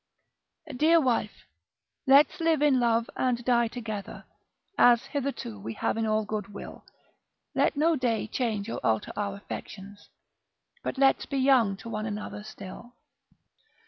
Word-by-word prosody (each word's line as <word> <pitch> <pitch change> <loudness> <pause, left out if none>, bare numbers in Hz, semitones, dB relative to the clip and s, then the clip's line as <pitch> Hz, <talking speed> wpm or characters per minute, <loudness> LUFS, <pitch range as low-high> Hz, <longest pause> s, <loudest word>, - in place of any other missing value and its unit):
Dear 320 +5 +5
wife, 240 -7 -1 0.6
let's 280 +5 +5
live 325 -3 +2
in 280 -4 +4
love, 235 -1 +2
and 240 -2 -1
die 240 -2 +3
together, 220 -4 -7 0.5
As 240 -7 +5
hitherto 270 - -4
we 110 +3 -6
have - - -1
in 225 0 -1
all 215 0 +1
good 210 -1 -4
will: 200 - -10 0.7
Let - - +1
no 325 +2 +3
day 240 -5 0
change 215 -3 -2
or - - -4
alter 110 -1 0
our 200 -1 -2
affections. 200 0 -9 0.7
But - - -4
let's 270 0 +3
be 275 - -3
young 255 -7 +3
to 230 - -9
one 215 0 -3
another 210 0 -5
still. 215 +3 -10
230 Hz, 145 wpm, -27 LUFS, 205-265 Hz, 0.7 s, Dear